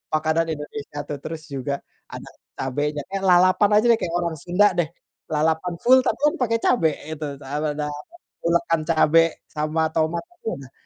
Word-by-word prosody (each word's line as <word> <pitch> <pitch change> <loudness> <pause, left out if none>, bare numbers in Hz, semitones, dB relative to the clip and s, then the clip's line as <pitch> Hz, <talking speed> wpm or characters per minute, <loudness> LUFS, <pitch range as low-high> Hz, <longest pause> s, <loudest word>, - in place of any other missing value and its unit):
makanan 160 +1 +1
Indonesia 145 0 -7
tuh 145 - -4
terus 160 0 -6
juga 140 0 -3 0.4
ada - - -8 0.3
cabenya 145 +3 -2
eh, 195 - -2
lalapan 185 +3 +5
aja 230 - 0
deh - - +6
kayak 170 0 -2
orang 170 -2 -2
Sunda 190 +4 +4
deh. 175 -3 0 0.4
Lalapan 160 +3 +1
full 260 +2 +6
tapi - - 0
kan - - +1
pakai 230 -1 +2
cabe 165 -10 +4 0.2
itu 160 -1 -5 0.2
dabeda 150 +2 -2
apa, 150 0 -7 0.4
ulekan 170 -1 +2
cabe 165 0 +5 0.3
sama 155 +1 -1
tomat 160 +1 0
aja 350 - -23
udah 135 -1 -12
160 Hz, 165 wpm, -23 LUFS, 150-175 Hz, 0.4 s, deh